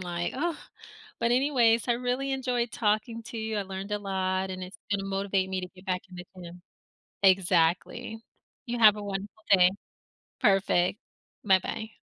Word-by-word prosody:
like, 175 -1 -3
"Oh," 330 +4 -2 0.6
but 235 +1 +1
anyways, 245 -3 +3
I 240 - +3
really 250 +3 -2
enjoyed 250 -3 -1
talking 220 +1 -1
to 230 - -8
you. 220 0 -3
I - - 0
learned 195 +1 -7
a 210 - 0
lot 190 -1 -1
and 185 - -6
it's 190 +4 -10
gonna 195 -1 0
motivate 195 -1 -1
me 190 -1 -2
to 180 - -5
get 185 +1 -16
back 185 -1 -1
in 180 - -12
the 180 - -8 0.2
gym. 175 +1 -11 0.6
Exactly. 185 +3 +2 0.4
You 240 0 -3
have 215 -2 +8
a 210 - -6
wonderful 200 +2 -6
day. 180 -1 +7 0.7
Perfect. 195 -1 +3 0.5
Bye-bye. 210 +3 +1
200 Hz, 165 wpm, -28 LUFS, 185-230 Hz, 0.7 s, have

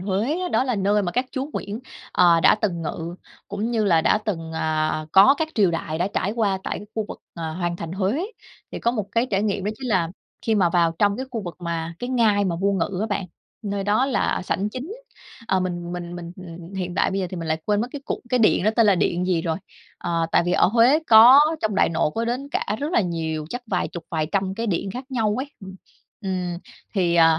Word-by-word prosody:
Huế 225 - -1
đó - - +3
là 250 -3 0
nơi 205 +1 +2
mà 175 -2 -2
các 250 +1 +1
chúa 265 - -2
Nguyễn, 210 +4 -4 0.3
ờ, 170 -2 +5
đã - - +6
từng 175 -6 -2
ngự, 165 +2 -4 0.3
cũng 205 +3 -2
như 225 -3 +1
là 170 -5 +4
đã 210 - +3
từng, 165 -7 -4
à, 155 -1 -1
có 200 +9 +8
các 320 - 0
triều 200 -5 +4
đại 165 -1 -3
đã 180 +3 0
trải 200 - 0
qua 210 -4 0
tại - - -3
cái 205 - -10
khu 220 - -1
vực, - - -7 0.2
à, 165 -2 -4
Hoàng 175 +1 -2
thành 165 -1 -6
Huế. 205 - 0 0.5
Thì - - -4
có 235 - +1
một 215 -5 -3
cái 235 +2 +2
trải 195 0 +1
nghiệm 200 -2 -1
đó 210 - 0
chính 260 - -5
là 185 -6 +2 0.4
khi 225 - +3
mà 185 -5 +3
vào 170 -1 +3
trong 205 -1 +3
cái 260 +2 -4
khu 225 -3 -4
vực 175 -3 -7
mà 170 -1 -4
cái 245 - -4
ngai 220 -5 +3
mà 175 -3 -1
vua 200 +3 +1
ngự 190 0 -1
á 220 - 0
bạn, 200 -3 -2 0.4
nơi 200 -1 -3
đó 215 +6 +2
là 265 - 0
sảnh 195 +2 -1
chính. 260 - -6 0.6
Ờ, 190 -1 +2
mình 175 -1 -3
mình 175 -1 -5
mình, 170 -1 -7
ừm, 185 - -10
ừm, 175 +3 -11
hiện 180 -2 -3
tại - - +2
bây 195 - -1
giờ 185 - -1
thì 185 - -5
mình 165 -1 -5
lại 160 0 -1
quên 210 0 +1
mất 240 - -2
cái 290 - -6
cụ - - -3
cái 250 0 +2
điện 215 -4 +3
đó 215 - +4
tên 230 -3 +5
là 200 - +5
điện 180 0 0
gì 175 -3 +1
rồi. 165 -2 -1 0.4
Ờ, 165 -1 -1
tại - - +5
vì 175 - +1
ở - - +4
Huế 235 +8 +5
có 235 +5 +9 0.2
trong 215 -2 0
Đại - - +3
Nội 165 -2 0
có 230 +1 -1
đến 255 +4 -3
cả 210 - -1
rất 300 +4 -2
là - - +4
nhiều, 160 -4 -2
chắc 245 0 -4
vài 185 -5 -1
chục, 170 -2 -8
vài 155 -2 0
trăm 190 -1 0
cái 230 +3 -3
điện 195 0 -1
khác 250 +6 -6
nhau 220 -5 +1
ấy. 280 +2 -6
Ừm, 190 -1 -9 0.5
ừm, 180 -3 -3 0.4
thì, 175 -4 +2
à 165 -1 +5
195 Hz, 255 wpm, -23 LUFS, 170-220 Hz, 0.6 s, có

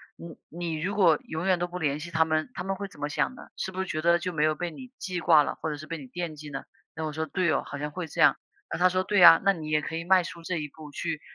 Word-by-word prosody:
你 170 -1 -10
你 165 -2 -4
如 185 +6 -2
果 170 -7 +5
永 160 +3 -4
远 185 -2 +3
都 175 - -1
不 180 +1 -6
联 150 -3 0
系 170 +3 -7
他 160 -1 +3
们， 155 +5 -1
他 - - -5
们 195 0 -2
会 200 0 -4
怎 150 - -16
么 145 - -1
想 255 - -1
呢？ - - -11 0.2
是 190 - -4
不 190 - -2
是 190 - -2
觉 155 -3 -3
得， 170 +1 +4
就 180 +1 -4
没 155 -2 +1
有 155 - +2
被 175 +1 -4
你 255 +7 -11
记 180 -2 -4
挂 160 -3 +6
了， - - -3
或 160 - -2
者 150 - -3
是 155 +1 -10
被 165 - -4
你 135 - -10
惦 165 +2 -5
记 150 0 -9
呢？” 135 - -5 0.3
那 160 - -4
我 155 - -2
说： 160 +1 -3
“对 180 +1 +1
哦， - - +1
好 140 - -6
像 150 +1 -3
会 170 +2 -5
这 - - -3
样。” - - +6 0.3
那 - - -2
他 180 - +6
说： 185 +1 +1
“对 205 +1 +1
呀， 165 -2 +9
那 195 - +5
你 160 -5 -6
也 155 0 +2
可 160 +2 -4
以 165 - -5
迈 185 0 +5
出 170 - -8
这 180 +2 -3
一 150 -1 -3
步， 155 +1 -12
去 160 +1 -3
165 Hz, 350 characters per minute, -27 LUFS, 155-180 Hz, 0.3 s, 呀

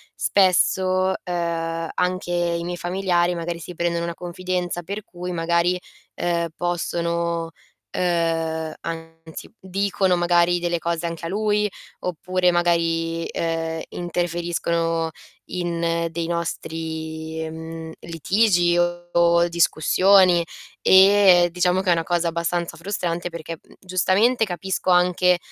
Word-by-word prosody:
spesso, 185 0 +2
ehm, 165 -2 -2
anche 180 0 -1
i 170 -1 0
miei 175 +1 -4
familiari 175 -1 0
magari 170 0 -4
si 180 - -8
prendono 170 0 -1
una 170 - -3
confidenza, 180 0 -3
per 200 +4 -5
cui 180 0 -7
magari, 170 +1 +1 0.4
ehm, 170 -1 -1
possono 170 -1 -1 0.5
ehm, 165 -2 0
anzi 165 +2 -8
dicono 190 -1 0
magari 175 0 +3
delle 175 -1 -1
cose 170 0 -2
anche 165 0 -4
a - - -5
lui, 210 +1 +1 0.3
oppure 180 +1 0
magari, 165 -1 +1
ehm, 165 -1 -2
interferiscono 170 -1 -1 0.4
in 170 -1 -1
dei 165 +1 -3
nostri, 160 -1 -4
mhmm, 160 0 -7
litigi 175 +1 +2
o 175 0 +2
discussioni. 175 +2 +4 0.4
E 190 -2 +6
diciamo 180 +1 +2
che 195 - -2
è - - +6
una 165 -1 +2
cosa 175 0 0
abbastanza 170 0 -2
frustrante 175 -2 -2
perché, 165 -1 -7
mhmm, - - -21
giustamente, 195 +6 +2
capisco 190 0 -3
anche 180 0 +4
175 Hz, 115 wpm, -23 LUFS, 165-180 Hz, 0.5 s, E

